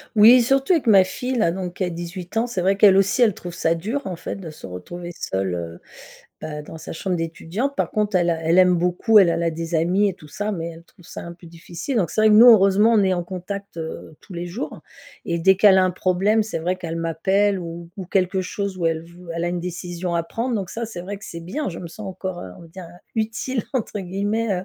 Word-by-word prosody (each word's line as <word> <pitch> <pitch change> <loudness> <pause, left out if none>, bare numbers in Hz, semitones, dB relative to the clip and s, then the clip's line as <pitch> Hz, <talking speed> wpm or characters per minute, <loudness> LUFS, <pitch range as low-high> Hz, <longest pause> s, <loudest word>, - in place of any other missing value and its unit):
Oui, 230 +4 +8
surtout 270 +7 +2
avec 310 -8 0
ma 195 -3 +7
fille 250 +7 -4
là, 190 -8 +2
donc 180 0 -5
qui 190 - -2
a 180 - 0
18 175 +4 -6
ans, 235 - +1
c'est 205 -7 -3
vrai 195 +2 +2
qu'elle 200 -2 +7
aussi, 195 +5 +2
elle 225 -4 +5
trouve 175 -1 -8
ça 165 -1 +1
dur, 220 +12 -3
en 185 - -4
fait, - - -6
de 185 -5 -8
se 150 - -12
retrouver 175 - -8
seule. 95 - -2
Heu, 85 0 -6 0.6
bah, 150 -1 -6
dans 160 - -10
sa - - -8
chambre 180 +2 -2
d'étudiante. 170 +11 -3
Par - - -1
contre, 210 -2 0
elle 175 -1 +2
a 165 -1 +1
elle 165 +3 +3
aime 180 -1 +6
beaucoup 180 +6 +3
elle 190 - +6
elle 170 - -1
a 170 - +1
des 165 +1 -5
amis 180 +6 +2
et - - -8
tout 155 - -15
ça, 205 +8 -3
mais 170 -3 -4
elle 165 0 -12
trouve 175 - -22
ça - - -8
un 170 - -8
peu 175 0 -15
difficile, 170 - -6
donc 190 -6 +1
c'est - - 0
vrai 220 - +6
que 210 - +6
nous, 225 +3 +9
heureusement, 205 +1 +5
on 215 - +4
est 190 -1 +2
en 175 - -2
contact, 195 +2 -7
heu, 160 0 -7
tous 185 - -13
les 170 0 -4
jours 190 +10 -6 0.4
et 170 - -1
dès 190 +3 +5
qu'elle 195 -1 +6
a 185 - +5
un 185 - +2
problème, 190 +5 +2
c'est 215 - -4
vrai 180 +3 -1
qu'elle 165 -3 -5
m'appelle 190 +5 +1
ou 170 0 -7
ou 190 - -5
quelque 185 +1 0
chose, 200 0 -4
où 175 - -4
elle 160 -1 0
v 170 +1 -16 0.2
elle 170 0 -2
a 175 - 0
une 175 0 -2
décision 175 0 -4
à 170 - +1
prendre, 235 +7 -3
donc 190 -3 -4
ça 235 - -4
c'est 180 -6 -7
vrai 200 +3 -6
que 210 - -12
c'est 170 - -7
bien! 220 - -4
Je 170 - -7
me 175 - -7
sens 210 +4 -9
encore, 185 -1 -5
heu, 95 - -8
on - - -12
va - - -12
dire, 185 +2 -10
heu, 175 +1 -14 0.2
«utile» 225 +2 -2
entre 225 -5 -2
guillemets, 205 +4 -1
heu, 180 0 -4
185 Hz, 270 wpm, -22 LUFS, 170-205 Hz, 0.6 s, nous